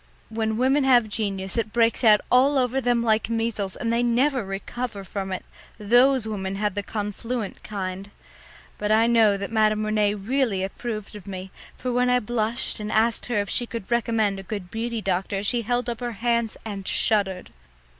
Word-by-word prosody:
When 220 -1 -1
women 265 +4 +3
have 245 -4 +4
genius 200 -1 -2
it 220 -1 -2
breaks 230 +2 +2
out 215 -2 +6
all 270 +3 +5
over 260 +1 +1
them 240 -1 +2
like 220 -1 +1
measles, 225 -4 -1
and 230 -1 -2
they 235 - +2
never 245 +2 +2
recover 200 +2 -5
from 195 0 -5
it; 185 - -4 0.3
those 245 +3 +4
women 195 -3 -3
had 205 0 -1
the 205 - -2
confluent 210 +2 -4
kind. 195 -1 -5 0.7
But 210 0 -1
I 220 +1 +5
know 225 -4 +4
that 200 +2 -5
Madame 215 -1 +2
Rene 210 -1 +1
really 215 -1 0
approved 215 +1 -5
of 205 -2 -11
me, 190 -1 -7 0.3
for 250 - -3
when 250 0 +2
I 250 0 +4
blushed 230 +1 -1
and 210 0 -4
asked 225 +1 +1
her 240 -3 -1
if 200 - -5
she 240 - 0
could 230 -2 -7
recommend 225 -4 +1
a 195 - -12
good 200 -5 -5
beauty 230 0 -3
doctor 195 +1 -1
she 235 +3 0
held 245 +2 -1
up 235 -2 -3
her 240 -1 -3
hands 235 +1 0
and 200 -3 -6
shuddered. 195 -4 +1
220 Hz, 185 wpm, -24 LUFS, 200-240 Hz, 0.7 s, out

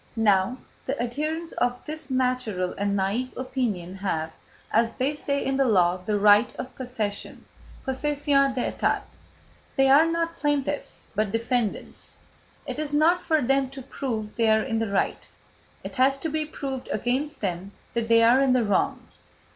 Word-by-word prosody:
Now, 210 +1 +3 0.3
the 270 +2 -2
adherents 305 +8 -2
of 245 0 -1
this 310 -1 -7
natural 250 -8 0
and 200 0 0
naïve 210 +7 -1
opinion 245 -9 -2
have, 160 -5 -2 0.4
as 230 +1 +2
they 270 +3 0
say 280 -1 -2
in 270 0 0
the 275 - +3
law, 180 -5 +3
the 205 +3 -1
right 205 +2 +6
of 255 - -6
possession 225 -6 -4 0.4
(possession 275 0 +1
d'état); 250 - 0 0.7
they 270 -1 +4
are 295 +4 +7
not 335 0 -1
plaintiffs 290 -2 -2
but 215 -1 0
defendants; 230 -1 -2 0.5
it - - -5
is 300 -1 -2
not 335 +4 +4
for 315 -3 +1
them 270 +1 +2
to 270 0 -9
prove 225 -6 -4
they 225 -2 +3
are 220 0 +4
in 225 -3 -1
the 225 -2 -1
right, 200 -1 -1 0.6
it - - -7
has 270 +2 +4
to 320 +4 -3
be 310 0 0
proved 270 -4 -5
against 260 +7 -1
them 190 0 -3 0.2
that 235 -1 -1
they 230 0 +5
are 240 +4 +6
in 270 -2 +4
the 250 -2 +3
wrong. 205 -2 0
250 Hz, 165 wpm, -25 LUFS, 215-275 Hz, 0.7 s, are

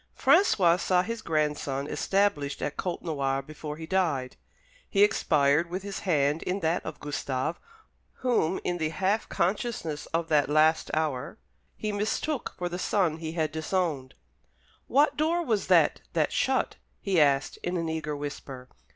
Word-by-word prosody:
François 180 - +4
saw 180 0 +2
his 230 +2 -4
grandson 150 -5 -1
established 150 -4 0
at 145 - -2
Côtenoir 140 -6 -2
before 150 0 -7
he 160 - -7
died. 160 -8 0 0.5
He 200 0 +4
expired 155 -6 +3
with 185 +2 -4
his 200 -1 -5
hand 150 -4 +1
in 190 +2 -2
that 165 +1 0
of 160 - -7
Gustave, 145 +1 -3 0.7
whom, 190 -8 +2
in 175 -1 -2
the 155 -1 0
half 190 +6 0
consciousness 180 -5 -2
of 165 0 -1
that 145 -3 +3
last 155 +2 +3
hour, 155 -5 -2 0.4
he 215 - -2
mistook 220 +7 -2
for 180 - -2
the 175 +1 -5
son 180 -5 +1
he 160 -1 -5
had 160 -2 -1
disowned. 155 -4 -2 0.7
"What 285 +4 +3
door 330 +3 +1
was 220 -6 0
that - - +4
that - - +1
shut?" - - 0 0.2
he 190 -5 +2
asked, 140 -1 +2
in 180 +1 -3
an 165 -1 -2
eager 160 -2 -3
whisper. 140 -3 -7
160 Hz, 150 wpm, -28 LUFS, 145-190 Hz, 0.7 s, François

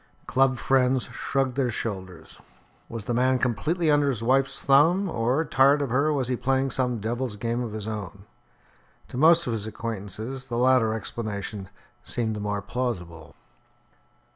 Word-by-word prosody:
Club 130 0 +2
friends 130 0 +2
shrugged 135 -2 -2
their 130 -3 +1
shoulders. 95 -6 -6 0.5
Was 115 -3 -6
the 120 - -1
man 130 +2 +3
completely 155 - 0
under 145 -1 +3
his 115 -4 -2
wife's 135 +2 +1
thumb; 160 +8 +4
or, 130 +2 0
tired 140 0 +4
of 140 -4 -2
her, 140 +5 +2
was 135 -4 0
he 125 - 0
playing 135 +2 0
some 125 -2 -1
devil's 120 +2 -3
game 115 +4 -2
of 115 -3 -4
his 110 -1 -5
own? 100 -2 -6 0.8
To - - -7
most 165 +4 +5
of 120 - -1
his 110 -1 -3
acquaintances 115 +4 -5
the 120 - -3
latter 125 -3 +3
explanation 105 -3 -5 0.3
seemed 110 -3 -2
the - - -5
more 105 -1 -2
plausible. 95 -9 -4
125 Hz, 160 wpm, -26 LUFS, 110-135 Hz, 0.8 s, most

